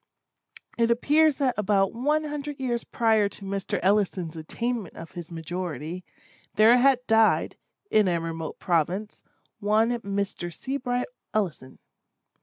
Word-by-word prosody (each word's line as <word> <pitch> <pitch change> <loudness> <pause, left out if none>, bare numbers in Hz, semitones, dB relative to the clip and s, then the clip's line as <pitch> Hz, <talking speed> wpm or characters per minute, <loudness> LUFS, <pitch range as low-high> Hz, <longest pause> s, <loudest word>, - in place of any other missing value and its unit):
It 230 0 +3
appears 295 +6 +4
that 265 -3 +1
about 195 -1 +2
one 295 +6 +1
hundred 295 -1 -5
years 240 -3 -1
prior 220 -3 +2
to 200 - -11
Mr. 195 -1 -2
Ellison's 190 -4 +1
attainment 220 +5 -4
of 165 - -9
his 175 -2 -8
majority, 170 0 -5 0.5
there 220 +3 +7
had 255 -1 +3
died, 225 -2 +3 0.4
in 215 -2 +4
a 170 -2 +1
remote 165 -1 -5
province, 180 +5 -1 0.4
one 220 +4 +2
Mr. 200 -4 -3
Seabright 250 - -2 0.3
Ellison. 175 -11 -2
210 Hz, 125 wpm, -26 LUFS, 180-245 Hz, 0.5 s, there